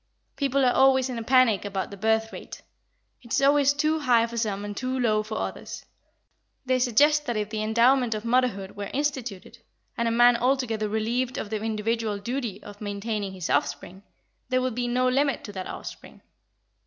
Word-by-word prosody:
People 275 -1 +1
are 250 - +3
always 265 -1 +4
in 240 - -4
a - - -5
panic 255 -4 +4
about 195 -1 -4
the - - -7
birth 220 +2 0
rate; - - -9 0.6
it 235 -3 -15
is - - +3
always 280 0 +4
too 305 +2 0
high 245 -5 +3
for 235 0 -8
some 205 -3 -2
and 205 0 -6
too 255 +4 -2
low 215 -3 +2
for 215 +1 -5
others. - - -6 0.8
They 255 0 +1
suggest 295 +5 +3
that 240 - -1
if 210 0 -3
the 215 -1 -2
endowment 235 +2 +3
of 215 +1 -6
motherhood 230 -6 0
were 200 -1 -5
instituted, 250 -7 -3 0.4
and 235 - -1
a - - +1
man 240 +1 +5
altogether 235 -4 0
relieved 235 +4 -1
of 205 - -5
the 215 -1 -2
individual 220 0 -1
duty 230 -1 -4
of 205 0 -12
maintaining 205 -1 -3
his 185 -3 -5
offspring, 175 +6 -2 0.5
there 255 0 +2
would 255 -2 -1
be 245 +1 -2
no 250 +1 +1
limit 275 +2 +1
to 205 - -7
that 190 -2 -6
offspring. - - -9
230 Hz, 190 wpm, -26 LUFS, 215-255 Hz, 0.8 s, man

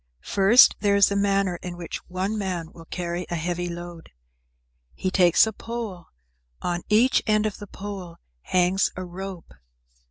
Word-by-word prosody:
First, 205 +6 +6
there 205 -1 +2
is 200 -1 +5
the 200 - -2
manner 195 -2 +1
in 175 0 -7
which 170 -1 -6
one 185 +4 -2
man 180 -5 -3
will 165 - -13
carry 175 +1 -4
a 175 - -2
heavy 175 +1 -2
load. 170 -1 -8 0.9
He 185 - -2
takes 180 -1 +5
a 220 - -4
pole, 225 -6 -6 0.5
on 175 0 -2
each 230 +5 +4
end 215 0 +3
of 215 - -2
the 205 - -8
pole 195 -4 -8 0.3
hangs 185 - +2
a 185 - -5
rope. 185 0 -8
185 Hz, 160 wpm, -24 LUFS, 175-200 Hz, 0.9 s, First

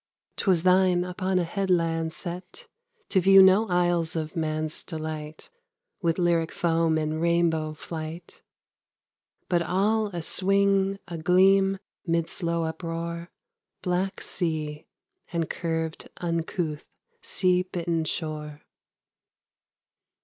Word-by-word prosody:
'Twas 180 -4 +2
thine, 185 -1 +4
upon 185 +1 -1
a 180 - +2
headland 165 -3 0
set, 180 +2 -7 0.4
To 190 - +3
view 195 +2 +7
no 190 +4 +5
isles 175 -3 +1
of 160 +1 -3
man's 155 -1 -2
delight 155 -2 -6 0.5
With 170 -2 +1
lyric 170 -2 +2
foam 165 -1 +1
in 155 0 -1
rainbow 165 -2 +1
flight, 160 +2 -7 1.1
But 175 -2 +2
all 210 +5 +1
a 175 -5 -5
swing, 195 +1 +2
a 170 -2 -6
gleam, 195 +3 +4 0.3
mid 165 -1 0
slow 170 -2 -1
uproar, 170 +1 -4 0.5
Black 180 +2 -1
sea, 155 -3 -3 0.4
and 165 -2 -1
curved 160 -1 -3
uncouth 165 -2 -2 0.4
sea 180 -1 +2
bitten 170 -3 -2
shore. 150 -2 -5
170 Hz, 105 wpm, -26 LUFS, 160-185 Hz, 1.1 s, view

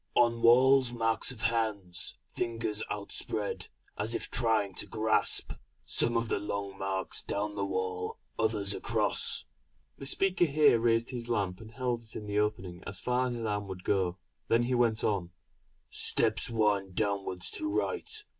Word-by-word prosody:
On 115 -1 +3
walls 130 +2 +6
marks 115 +1 +1
of 120 -3 -7
hands, 105 -7 0 0.2
fingers 115 -2 -2
outspread, 105 0 -3 0.3
as 110 +3 -1
if - - -4
trying 110 -5 +1
to - - -1
grasp. 110 -1 +1 0.3
Some 120 0 +3
of 115 0 0
the - - 0
long 100 -1 -4
marks 95 -1 -2
down 105 +1 -2
the 100 -1 -2
wall 95 -1 -2 0.2
others 105 -3 +1
across." - - +1 0.5
The 135 - -5
speaker 185 +3 +2
here 150 -5 +5
raised 115 +1 +2
his 120 -2 -5
lamp 100 -4 -1
and 110 - -10
held 120 0 -2
it 110 -1 -13
in 105 - -5
the 105 0 0
opening 95 -4 -2
as - - -4
far 125 +1 +1
as 120 - -2
his 115 -1 -4
arm 105 -1 -2
would 95 -1 -7
go; 95 -3 +1 0.3
then 115 +1 +3
he 125 +2 0
went 120 -3 +2
on: 90 -4 0 0.6
"Steps - - 0
wind 105 -5 +1
downwards 100 -4 -1
to 310 0 -3
right. 415 +3 -1
110 Hz, 165 wpm, -30 LUFS, 100-120 Hz, 0.6 s, walls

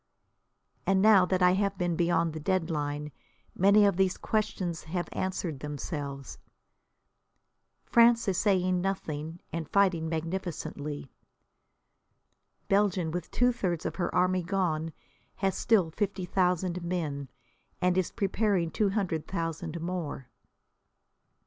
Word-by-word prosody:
And 195 0 +4
now 200 -2 +6
that 185 -1 +1
I 180 - +6
have 195 +1 0
been 175 -1 0
beyond 170 -1 +1
the 160 - -5
dead 180 +1 0
line 150 -1 -3 0.4
many 200 +3 +5
of 200 -3 +2
these 190 -1 +2
questions 185 -6 -2
have 175 +2 -3
answered 180 -6 -3
themselves. 145 -1 -5 1.4
France 235 -1 +4
is 190 -2 +1
saying 185 -3 +2
nothing, 165 -4 -3
and 165 -2 -4
fighting 180 -5 +2
magnificently, 160 -4 -4 1.6
Belgium, 195 -5 +2
with 175 0 -4
two 245 0 +3
thirds 180 -9 -2
of - - -3
her 175 -2 -1
army 185 0 +3
gone, 165 -3 -1 0.4
has 195 -1 0
still 190 -8 +2
fifty 190 +1 -2
thousand 180 -1 0
men, 155 -6 -3 0.5
and 180 -1 +2
is 185 -2 +1
preparing 195 -4 0
two 210 -3 +1
hundred 185 -6 -2
thousand 165 -2 -3
more. 165 -7 -4
180 Hz, 125 wpm, -29 LUFS, 160-195 Hz, 1.6 s, now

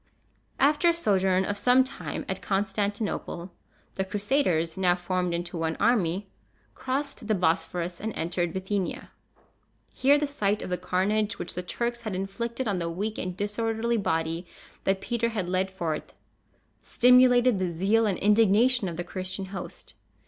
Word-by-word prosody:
After 295 +5 +4
a 335 - +2
sojourn 190 - +2
of 205 +1 -2
some 250 +4 +5
time 260 - -6
at - - -3
Constantinople, 200 -2 -2 0.4
the 190 - -1
Crusaders, 190 - 0
now 180 -2 +3
formed 180 0 -1
into 170 0 -3
one 160 0 -1
army, 200 -4 +1 0.5
crossed 270 -3 -3
the 215 - +2
Bosphorus, 175 0 -1
and 220 +2 -2
entered 175 +1 -1
Bithynia. 190 +1 -3 0.8
Here 280 +2 +4
the 295 - 0
sight 210 -8 -1
of - - -6
the 180 - 0
carnage 195 +4 0
which 170 - -5
the 180 - -3
Turks 235 +6 -3
had 215 -5 -4
inflicted 235 +6 -3
on 195 -3 0
the 170 -1 -2
weak 205 +6 -3
and 180 -1 -4
disorderly 225 +3 -1
body 165 -2 -1 0.4
that 195 0 +1
Peter 235 +2 -1
had 205 -6 -3
led 185 +1 0
forth, 170 -5 -4 0.7
stimulated 250 -2 +5
the 185 -1 0
zeal 200 +7 +2
and 195 -4 0
indignation 215 +2 +4
of 165 - -7
the 175 - -2
Christian 185 +2 -3
host. 190 - -8
195 Hz, 155 wpm, -27 LUFS, 180-230 Hz, 0.8 s, some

